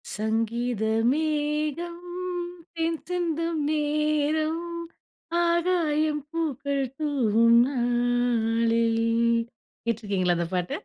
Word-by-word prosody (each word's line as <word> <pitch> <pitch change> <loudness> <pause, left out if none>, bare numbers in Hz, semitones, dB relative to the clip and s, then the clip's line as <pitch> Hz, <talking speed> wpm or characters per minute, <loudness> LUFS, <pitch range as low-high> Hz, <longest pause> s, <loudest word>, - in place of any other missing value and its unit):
"சங்கீத 225 +2 -1 0.3
மேகம் 305 +3 -1 0.7
தேன் 330 -1 -1
சிந்தும் 335 -2 -1
நேரம், 305 +1 +1 0.9
ஆகாயம் 320 -4 +1
பூக்கள் 280 -4 -1
தூவும் 235 -6 +3
நாளில்" 235 -2 +1 0.8
கேட்டுருக்கிறீங்களா 200 -6 0
அந்த 170 -1 -1
பாட்ட? 180 -1 -1
285 Hz, 65 wpm, -26 LUFS, 230-310 Hz, 0.9 s, தூவும்